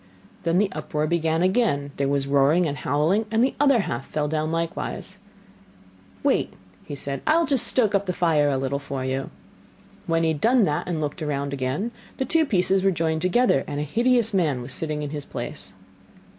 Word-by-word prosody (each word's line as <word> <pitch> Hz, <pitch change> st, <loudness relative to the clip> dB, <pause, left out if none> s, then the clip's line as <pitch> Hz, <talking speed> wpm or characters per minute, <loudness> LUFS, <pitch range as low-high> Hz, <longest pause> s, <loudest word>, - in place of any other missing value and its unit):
Then 165 Hz, +1 st, +2 dB
the 200 Hz, 0 st, +2 dB
uproar 150 Hz, 0 st, -2 dB
began 165 Hz, 0 st, +1 dB
again, 185 Hz, -8 st, +1 dB
there 140 Hz, -, 0 dB
was 140 Hz, 0 st, 0 dB
a -, -, -8 dB
roaring 140 Hz, +5 st, +4 dB
and 145 Hz, -3 st, -2 dB
howling, 160 Hz, +10 st, +1 dB
and 225 Hz, +2 st, +2 dB
the 265 Hz, -, +1 dB
other 275 Hz, -5 st, +4 dB
half 120 Hz, -9 st, -4 dB
fell 150 Hz, -1 st, -2 dB
down 155 Hz, +1 st, -1 dB
likewise. 165 Hz, 0 st, -4 dB, 1.0 s
'Wait,' -, -, +1 dB, 0.4 s
said 140 Hz, 0 st, -4 dB
he, -, -, -22 dB
'I 310 Hz, +1 st, +5 dB
will 335 Hz, -, +3 dB
just 275 Hz, -4 st, +3 dB
stoke 220 Hz, -5 st, +3 dB
up 200 Hz, 0 st, +1 dB
the -, -, +1 dB
fire 160 Hz, -5 st, +2 dB
a 135 Hz, -, 0 dB
little 135 Hz, +1 st, -2 dB
for 140 Hz, -2 st, -5 dB
you.' 135 Hz, +1 st, -2 dB, 0.8 s
When 165 Hz, 0 st, +1 dB
he 165 Hz, -, +2 dB
had 155 Hz, -2 st, -2 dB
done 240 Hz, 0 st, +4 dB
that 150 Hz, -6 st, -1 dB
and 170 Hz, -3 st, -2 dB
looked 150 Hz, +3 st, -4 dB
round 140 Hz, -2 st, -2 dB
again, 140 Hz, -, -2 dB, 0.3 s
the 265 Hz, -, -1 dB
two 320 Hz, +3 st, +2 dB
pieces 190 Hz, -3 st, +2 dB
were 195 Hz, -, +3 dB
joined 160 Hz, -3 st, -1 dB
together, 185 Hz, -, +3 dB
and 145 Hz, -, -4 dB
a -, -, -1 dB
hideous 235 Hz, -, +2 dB
man 150 Hz, -10 st, +1 dB
was 125 Hz, -, -6 dB
sitting 155 Hz, -2 st, -3 dB
in 145 Hz, -, -5 dB
his 150 Hz, -2 st, -5 dB
place. -, -, -5 dB
160 Hz, 205 wpm, -24 LUFS, 145-200 Hz, 1.0 s, I